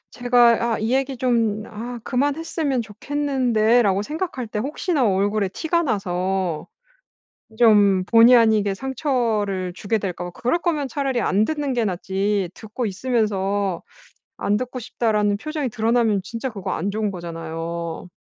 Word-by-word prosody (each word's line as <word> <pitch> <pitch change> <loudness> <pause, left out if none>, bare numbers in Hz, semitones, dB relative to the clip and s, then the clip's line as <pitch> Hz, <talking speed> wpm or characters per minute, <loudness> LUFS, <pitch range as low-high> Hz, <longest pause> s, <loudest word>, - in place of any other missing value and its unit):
제가 245 -1 +4
'아 - - -5
이 220 +3 0
얘기 270 0 -1
좀 230 -4 +1
아 235 +3 -7
그만했으면 285 0 -1
좋겠는데.'라고 235 -3 +1
생각할 300 - -4
때 215 - -5
혹시나 285 - 0
얼굴에 200 +1 +1
티가 335 - 0
나서 190 - -1 0.9
좀 205 -5 +5
본의 230 +4 +7
아니게 215 -4 +3
상처를 225 - -1
주게 205 +4 -1
될까 180 -3 -4
봐. 175 - -5
그럴 250 +8 0
거면 310 -5 -1
차라리 270 -1 -1
안 205 +2 +2
듣는 295 -3 -2
게 240 -2 +1
낫지 195 0 -1
듣고 220 +3 -6
있으면서 200 -4 -1 0.6
안 205 - +1
듣고 255 +2 -5
싶다라는 210 -3 0
표정이 300 +2 -3
드러나면 225 -2 +1
진짜 230 +6 -4
그거 200 -6 -5
안 195 +5 -2
좋은 215 0 -1
거잖아요. 165 -1 -5
220 Hz, 300 characters per minute, -22 LUFS, 195-255 Hz, 0.9 s, 본의